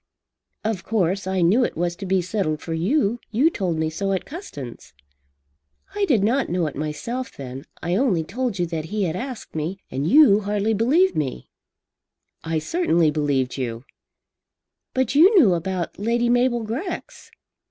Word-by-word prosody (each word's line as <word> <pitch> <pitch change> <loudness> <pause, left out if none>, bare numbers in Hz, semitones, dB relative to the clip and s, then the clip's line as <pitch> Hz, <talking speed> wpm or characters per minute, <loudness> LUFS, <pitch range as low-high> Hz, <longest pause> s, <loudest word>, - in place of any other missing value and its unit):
"Of 215 -4 -2
course 195 -3 0
I 190 -1 0
knew 200 +9 +4
it - - -2
was 175 0 -1
to 195 - -6
be 185 -1 +2
settled 175 -5 -1
for 165 - -5
you. 215 - +1
You 265 +9 +3
told 180 - -2
me 160 0 -1
so 195 +4 -1
at 190 - -2
Custins." 145 - -9 1.0
"I 415 -1 +1
did 240 - +2
not 255 +6 +1
know 175 -1 0
it 150 - -4
myself 195 - -4
then. 135 +1 -7 0.2
I 175 +1 0
only 200 -8 +2
told 235 +4 -3
you 175 - +1
that 165 -2 -4
he 210 +5 -2
had 165 -3 -1
asked 250 +3 -6
me. 160 +5 -2
And 135 +3 -2
you 240 -6 +7
hardly 210 +1 0
believed 295 - +3
me." 130 - -3 0.9
"I 165 0 -1
certainly 170 - +2
believed 140 -4 0
you." 120 -1 -4 1.1
"But 260 -2 +1
you 365 +9 +6
knew 215 - +5
about 180 +1 -3
Lady 235 +3 +1
Mabel 245 -1 +2
Grex." 260 - -5
195 Hz, 165 wpm, -23 LUFS, 160-240 Hz, 1.1 s, you